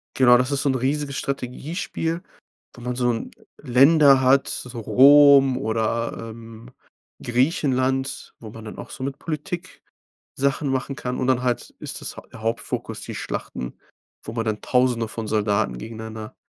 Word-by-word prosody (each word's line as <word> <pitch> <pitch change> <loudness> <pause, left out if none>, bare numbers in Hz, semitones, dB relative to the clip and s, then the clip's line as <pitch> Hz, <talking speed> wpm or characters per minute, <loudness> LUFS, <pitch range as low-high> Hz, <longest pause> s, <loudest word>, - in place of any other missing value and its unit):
Genau, 125 -2 +6
das 125 +2 0
ist 140 -1 0
so 145 - +1
'n 130 - +1
riesiges 140 +2 -1
Strategiespiel, 160 +5 -3 0.5
wo 120 - -12
man 125 +1 -3
so 125 -1 +1
'n 115 - -4 0.3
Länder 140 +1 +5
hat, 135 +2 +4
so 125 -1 -5
Rom 140 +2 +7
oder, 115 -1 -1 0.2
ähm, 115 +1 -11 0.5
Griechenland. 130 0 0
Wo 110 -2 -10
man 110 0 -11
dann 105 - -8
auch - - -9
so 130 - -7
mit 135 +1 -4
Politik 170 +3 -5 0.6
Sachen 140 +1 0
machen 135 +1 -2
kann. 125 -1 -4
Und 130 - -1
dann 130 -1 +2
halt 125 -1 -1
ist - - -7
das - - -6 0.2
der 110 - -11
Hauptfokus 115 +1 -3
die - - -7
Schlachten, 60 -1 -5 0.4
wo 110 - -7
man 115 -1 -2
dann 110 -1 -2
tausende 125 -3 +1
von 110 0 -6
Soldaten 105 0 0
gegeneinander 110 -1 -8
125 Hz, 160 wpm, -23 LUFS, 115-140 Hz, 0.6 s, Rom